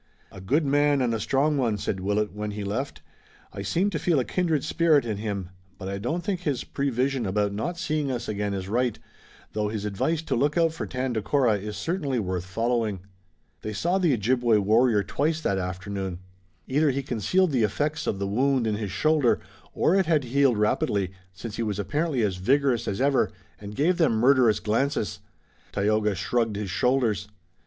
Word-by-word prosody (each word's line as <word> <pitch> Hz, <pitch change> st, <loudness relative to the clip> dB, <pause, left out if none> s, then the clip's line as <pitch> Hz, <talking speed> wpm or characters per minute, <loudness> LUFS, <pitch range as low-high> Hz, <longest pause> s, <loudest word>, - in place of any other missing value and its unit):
"A 95 Hz, -, -10 dB
good 145 Hz, -, +1 dB
man 145 Hz, 0 st, +3 dB
and 125 Hz, -3 st, +1 dB
a 115 Hz, -, -1 dB
strong 140 Hz, +5 st, +1 dB
one," 115 Hz, -5 st, +1 dB
said 95 Hz, -1 st, -3 dB
Willet, 105 Hz, +2 st, 0 dB
when, 105 Hz, 0 st, -4 dB
he 105 Hz, 0 st, -5 dB
left. 115 Hz, +8 st, -4 dB, 0.5 s
"I 100 Hz, -, -5 dB
seem 175 Hz, -, 0 dB
to 155 Hz, -, -2 dB
feel 165 Hz, -2 st, +2 dB
a 125 Hz, -, 0 dB
kindred 165 Hz, -6 st, 0 dB
spirit 160 Hz, -5 st, +3 dB
in 110 Hz, -3 st, -2 dB
him, 100 Hz, -4 st, -4 dB, 0.3 s
but 95 Hz, -, -7 dB
I 100 Hz, 0 st, -3 dB
don't 160 Hz, -, -2 dB
think 200 Hz, -4 st, -1 dB
his 145 Hz, -8 st, -2 dB
prevision 135 Hz, -3 st, -1 dB
about 100 Hz, +1 st, 0 dB
not 170 Hz, +12 st, -3 dB
seeing 155 Hz, -5 st, -1 dB
us 125 Hz, -2 st, -3 dB
again 105 Hz, -1 st, -2 dB
is 95 Hz, -1 st, -4 dB
right, 120 Hz, +2 st, 0 dB, 0.6 s
though 105 Hz, -1 st, 0 dB
his 105 Hz, -1 st, -4 dB
advice 155 Hz, +11 st, -1 dB
to -, -, -1 dB
look 145 Hz, +6 st, +1 dB
out 165 Hz, -1 st, +3 dB
for -, -, -5 dB
Tandakora 125 Hz, -2 st, +1 dB
is 105 Hz, +1 st, -6 dB
certainly 155 Hz, -7 st, -1 dB
worth 90 Hz, -4 st, -2 dB
following." 115 Hz, -1 st, -1 dB, 0.6 s
They 110 Hz, -, -4 dB
saw 175 Hz, -, 0 dB
the 175 Hz, -5 st, +3 dB
Ojibway 120 Hz, 0 st, +2 dB
warrior 110 Hz, +1 st, +3 dB
twice 150 Hz, -, 0 dB
that 100 Hz, -10 st, 0 dB
afternoon. 95 Hz, 0 st, -4 dB, 0.5 s
Either 145 Hz, +3 st, +2 dB
he 135 Hz, +1 st, -1 dB
concealed 175 Hz, -, +1 dB
the 130 Hz, -4 st, +2 dB
effects 150 Hz, +9 st, -1 dB
of -, -, 0 dB
the 100 Hz, -, -2 dB
wound 130 Hz, +5 st, +1 dB
in 105 Hz, -2 st, 0 dB
his 105 Hz, -3 st, -4 dB
shoulder 150 Hz, -, +2 dB, 0.3 s
or 165 Hz, -, +2 dB
it 195 Hz, -2 st, +3 dB
had 155 Hz, -4 st, +3 dB
healed 130 Hz, -1 st, +2 dB
rapidly, 100 Hz, -2 st, +1 dB, 0.2 s
since 105 Hz, +4 st, -8 dB
he -, -, -2 dB
was 105 Hz, -3 st, -1 dB
apparently 145 Hz, -, 0 dB
as 95 Hz, -3 st, 0 dB
vigorous 125 Hz, +3 st, +2 dB
as 100 Hz, -, -2 dB
ever 140 Hz, 0 st, +3 dB, 0.3 s
and 105 Hz, 0 st, -8 dB
gave 170 Hz, +8 st, +2 dB
them 160 Hz, -8 st, +4 dB
murderous 120 Hz, -1 st, +4 dB
glances. 115 Hz, +2 st, -1 dB, 0.5 s
Tayoga 105 Hz, 0 st, +1 dB
shrugged 115 Hz, +3 st, 0 dB
his 100 Hz, -2 st, -4 dB
shoulders. 115 Hz, -4 st, +1 dB
120 Hz, 190 wpm, -26 LUFS, 105-145 Hz, 0.6 s, them